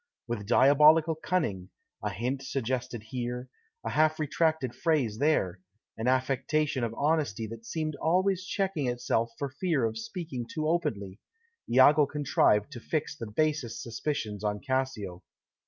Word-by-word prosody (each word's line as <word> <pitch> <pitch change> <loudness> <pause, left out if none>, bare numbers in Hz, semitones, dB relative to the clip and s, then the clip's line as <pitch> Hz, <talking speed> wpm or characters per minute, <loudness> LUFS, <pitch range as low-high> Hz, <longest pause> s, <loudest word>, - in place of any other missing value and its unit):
With 110 -4 -4
diabolical 150 +6 +6
cunning 155 - -2 0.3
a 105 - -1
hint 120 +8 -2
suggested 125 -3 -3
here, 125 0 -4 0.4
a - - -2
half 155 +1 +3
retracted 155 -3 0
phrase 135 -11 0
there, 115 - +1 0.4
an 110 +2 -3
affectation 130 +2 +1
of 115 -1 -2
honesty 145 -7 0
that 115 +1 -9
seemed 155 -2 -2
always 185 +3 +1
checking 185 -6 -1
itself 120 -1 0
for 140 - -2
fear 140 -2 0
of 110 0 -2
speaking 130 - -5
too 155 -1 -2
openly 110 - -1 0.5
Iago 140 +4 +6
contrived 140 -5 +2
to 125 - -7
fix 155 +6 -2
the 115 -7 -6
basest 145 +1 -1
suspicions 115 -4 -3
on 105 -1 -1
Cassio. 130 -9 -2
130 Hz, 140 wpm, -29 LUFS, 115-155 Hz, 0.5 s, diabolical